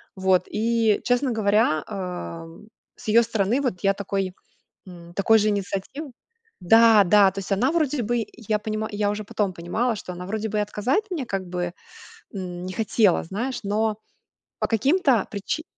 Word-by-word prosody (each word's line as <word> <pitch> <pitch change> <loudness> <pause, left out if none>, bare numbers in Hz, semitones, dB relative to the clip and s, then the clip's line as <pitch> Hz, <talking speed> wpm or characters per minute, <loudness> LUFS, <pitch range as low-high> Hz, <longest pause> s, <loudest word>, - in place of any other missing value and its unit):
Вот 190 -1 +2
и, 225 0 +1
честно 245 +2 +1
говоря, 210 -7 +2
эм, 180 -1 -7 0.3
с - - -14
ее 230 +2 +6
стороны 225 +3 0
вот 240 -10 -2
я 195 0 +4
такой, 195 -1 -3 0.5
м, 175 -2 -12
такой 220 +4 +4
же 215 0 +2
инициативы 205 +8 -4 0.5
Да, 225 +3 +6
да, 200 +1 +5
то 195 - -8
есть 195 +1 -5
она 240 +8 +2
вроде 295 -5 0
бы, 240 +2 0
и 215 0 -3
понима 215 0 -2
я 205 0 0
уже 210 +1 -3
потом 200 -1 -1
понимала, 220 +8 -1
что 185 - -7
она 180 0 -7
вроде 220 +2 -3
бы 210 0 -2
и - - +2
отказать 215 - 0
мне 325 -7 -2
как 195 -4 -2
бы, 175 -1 -3 0.6
м, 180 -2 -5
не 185 - -5
хотела, 215 -2 +2
знаешь, 240 +8 -4
но 215 +1 0 0.6
по - - 0
каким-то 265 - +2
причи 205 +10 -3
210 Hz, 170 wpm, -24 LUFS, 190-230 Hz, 0.6 s, ее